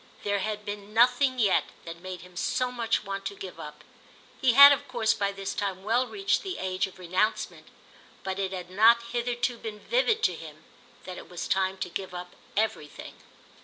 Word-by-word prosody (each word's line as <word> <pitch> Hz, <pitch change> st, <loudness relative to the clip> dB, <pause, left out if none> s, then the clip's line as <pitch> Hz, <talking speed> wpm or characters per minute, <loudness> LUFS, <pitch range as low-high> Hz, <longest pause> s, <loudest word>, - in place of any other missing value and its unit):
There 205 Hz, 0 st, 0 dB
had 210 Hz, +1 st, -3 dB
been 205 Hz, +1 st, -7 dB
nothing 250 Hz, +3 st, +4 dB
yet 210 Hz, -6 st, +3 dB, 0.2 s
that 170 Hz, 0 st, -8 dB
made 185 Hz, -1 st, -7 dB
him 180 Hz, 0 st, -15 dB
so 250 Hz, +6 st, -1 dB
much 230 Hz, -3 st, -1 dB
want 195 Hz, -1 st, -5 dB
to 200 Hz, -, -4 dB
give 190 Hz, -2 st, -9 dB
up. 150 Hz, 0 st, -9 dB, 0.6 s
He 255 Hz, -4 st, +4 dB
had 280 Hz, +3 st, +11 dB
of 285 Hz, 0 st, 0 dB
course 230 Hz, -3 st, +1 dB
by 200 Hz, -3 st, -1 dB
this 195 Hz, -1 st, -5 dB
time 195 Hz, -2 st, -3 dB
well 240 Hz, +5 st, +1 dB
reached 390 Hz, +4 st, 0 dB
the 380 Hz, -2 st, -5 dB
age 190 Hz, +1 st, -1 dB
of 190 Hz, -, -15 dB
renouncement; 185 Hz, +4 st, -1 dB, 0.6 s
but 190 Hz, 0 st, -3 dB
it 190 Hz, -1 st, -1 dB
had 180 Hz, -1 st, -6 dB
not 230 Hz, +4 st, +5 dB
hitherto 240 Hz, 0 st, -1 dB
been 215 Hz, -1 st, -7 dB
vivid 465 Hz, -, +1 dB
to 180 Hz, -, +3 dB
him 155 Hz, -1 st, -11 dB, 0.4 s
that 185 Hz, -1 st, -7 dB
it -, -, -13 dB
was 175 Hz, -1 st, -5 dB
time 190 Hz, 0 st, +1 dB
to 190 Hz, -, -3 dB
give 185 Hz, +1 st, -5 dB
up 180 Hz, 0 st, -8 dB, 0.2 s
everything. 210 Hz, -9 st, -2 dB
205 Hz, 195 wpm, -27 LUFS, 185-240 Hz, 0.6 s, had